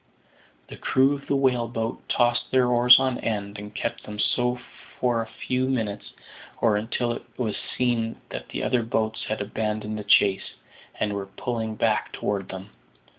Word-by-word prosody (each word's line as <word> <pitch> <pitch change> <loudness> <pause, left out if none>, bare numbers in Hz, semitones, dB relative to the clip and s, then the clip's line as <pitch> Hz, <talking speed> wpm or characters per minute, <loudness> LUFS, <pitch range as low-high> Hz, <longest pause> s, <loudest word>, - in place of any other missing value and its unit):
The - - -9
crew 135 +2 +3
of 140 -1 -7
the 140 - +2
whale 125 -3 +2
boat 115 0 -3
tossed 120 0 +2
their 130 -1 +4
oars 125 +1 +8
on 130 -2 0
end, 100 -2 -3
and 105 0 -9
kept 115 - -2
them 105 0 -7
so 125 +3 +1 0.4
for 120 -2 +2
a 115 - -5
few 130 +3 -1
minutes, 110 -6 -2 0.5
or 110 -3 +3
until 115 +3 -1
it - - -4 0.2
was 115 -4 -1 0.2
seen 120 -3 0
that - - -7
the - - -3
other 125 - +2
boats 110 -1 -1
had 110 - -2
abandoned 105 +1 -2
the - - -5
chase, 100 -1 +3 0.4
and 105 - 0
were 100 -1 -3
pulling 110 +1 -3
back - - +1
toward 100 -2 -2
them. 95 +2 -8
115 Hz, 175 wpm, -25 LUFS, 105-125 Hz, 0.5 s, oars